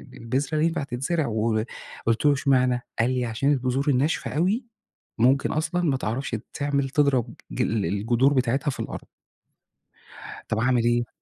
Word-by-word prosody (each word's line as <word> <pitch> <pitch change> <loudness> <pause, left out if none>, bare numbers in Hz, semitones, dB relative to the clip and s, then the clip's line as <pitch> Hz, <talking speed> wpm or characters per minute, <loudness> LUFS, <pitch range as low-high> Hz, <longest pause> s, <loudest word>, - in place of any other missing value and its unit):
البذرة 135 +6 -1
ينفع 165 -2 +1
تتزرع" 140 +4 -1
وقلت 110 +2 -2
له: 145 - +6
"اشمعنى؟" 130 -2 +2 0.2
قال 115 +3 +3
لي: 125 -1 0
"عشان 125 +5 0
البذور 130 +2 -1
الناشفة 140 +4 +1
أوي 195 - +1 0.5
ممكن 130 +4 +3
أصلًا 165 +3 -1
ما 140 -6 +2
تعرفش 120 +1 -2 0.2
تعمل 140 -2 -1
تضرب 140 -5 +2 0.3
الجذور 115 +5 +1
بتاعتها 130 +3 +1
في - - -7
الأرض." - - -6 1.4
طب 110 - 0
أعمل 125 0 +2
ايه؟ 120 0 +1
130 Hz, 135 wpm, -25 LUFS, 120-145 Hz, 1.4 s, له